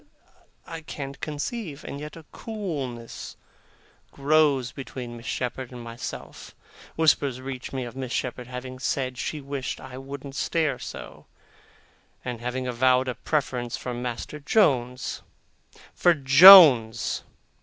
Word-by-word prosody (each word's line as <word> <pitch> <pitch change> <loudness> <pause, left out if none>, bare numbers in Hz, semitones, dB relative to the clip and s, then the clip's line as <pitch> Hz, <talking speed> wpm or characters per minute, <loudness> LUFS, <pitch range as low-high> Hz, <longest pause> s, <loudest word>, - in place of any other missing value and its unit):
I 165 0 -7
can't 140 -3 -7
conceive. 155 - -5
And 140 - -7
yet 150 +1 -8
a 165 -2 -12
coolness 145 - -6 0.7
grows 140 -3 +2
between 125 -3 -8
Miss 115 0 -10
Shepherd 125 0 -4
and 125 - -9
myself. 115 +1 -8 0.4
Whispers 145 -5 +2
reach 130 -1 -7
me 130 -2 -4
of 120 - -9
Miss 130 -2 -5
Shepherd 125 -1 -3
having 130 0 -7
said 130 -1 -2
she 150 - -4
wished 140 -1 -5
I 130 0 -9
wouldn't 140 0 -8
stare 155 -1 0
so, - - -9 1.0
and 120 -2 -5
having 125 +1 -3
avowed 130 +1 +2
a - - -2
preference 125 -5 -2
for 125 - -5
Master 120 +4 -5
Jones 130 - +1 0.7
for 175 -1 +3
Jones! 135 - +8
130 Hz, 125 wpm, -25 LUFS, 125-150 Hz, 1.0 s, Jones